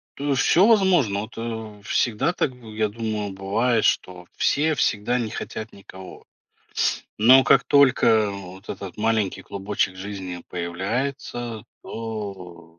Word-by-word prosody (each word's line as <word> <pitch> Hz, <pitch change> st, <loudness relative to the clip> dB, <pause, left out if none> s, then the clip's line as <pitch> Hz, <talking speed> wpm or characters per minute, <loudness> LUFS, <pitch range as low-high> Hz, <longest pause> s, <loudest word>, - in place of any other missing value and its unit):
то 145 Hz, +1 st, -4 dB
есть 135 Hz, -2 st, +2 dB
всё 185 Hz, +4 st, +5 dB
возможно. 180 Hz, -, +3 dB
Вот, 110 Hz, -, -9 dB
э, 110 Hz, -2 st, -6 dB
всегда 110 Hz, +8 st, +1 dB
так 130 Hz, -7 st, -1 dB
бы, 115 Hz, -3 st, -12 dB
я 110 Hz, 0 st, +1 dB
думаю, 105 Hz, -2 st, -3 dB
бывает, 110 Hz, +5 st, 0 dB
что 90 Hz, -1 st, 0 dB
все 155 Hz, +2 st, +2 dB
всегда 120 Hz, -1 st, +1 dB
не 115 Hz, -3 st, -2 dB
хотят 110 Hz, +1 st, -6 dB
никого. 95 Hz, -1 st, -12 dB, 0.9 s
Но 130 Hz, +4 st, +7 dB
как -, -, +5 dB
только 120 Hz, -6 st, +4 dB
вот 95 Hz, 0 st, -10 dB
этот 95 Hz, -2 st, -7 dB
маленький 110 Hz, -3 st, 0 dB
клубочек 100 Hz, -1 st, -2 dB
жизни 95 Hz, -2 st, -6 dB
появляется, 115 Hz, +6 st, -4 dB, 0.2 s
то 100 Hz, -6 st, -7 dB
э -, -, -17 dB
110 Hz, 135 wpm, -23 LUFS, 100-120 Hz, 0.9 s, Но